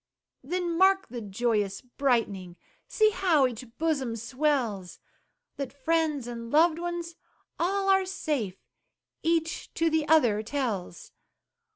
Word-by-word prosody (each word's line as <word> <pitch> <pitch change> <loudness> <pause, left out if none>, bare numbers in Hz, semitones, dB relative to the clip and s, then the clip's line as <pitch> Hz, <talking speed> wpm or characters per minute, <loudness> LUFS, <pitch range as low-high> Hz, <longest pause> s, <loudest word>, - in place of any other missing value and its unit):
Then 345 +3 -2
mark 385 0 +4
the 240 -1 -6
joyous 205 -1 -1
brightening; 230 -9 -1 0.3
See 430 -1 +3
how 350 -8 +3
each 250 0 -4
bosom 285 -8 0
swells; 235 -6 -1 0.6
That 275 -3 -4
friends 300 -1 0
and 235 -1 -6
loved 320 +4 +4
ones 345 -1 -4 0.5
all 390 +3 0
are 385 -1 +4
safe, 295 - -2 0.6
Each 330 0 -1
to 330 0 +2
the 315 -1 +1
other 240 -10 +4
tells. 220 -8 -4
285 Hz, 115 wpm, -28 LUFS, 230-335 Hz, 0.6 s, mark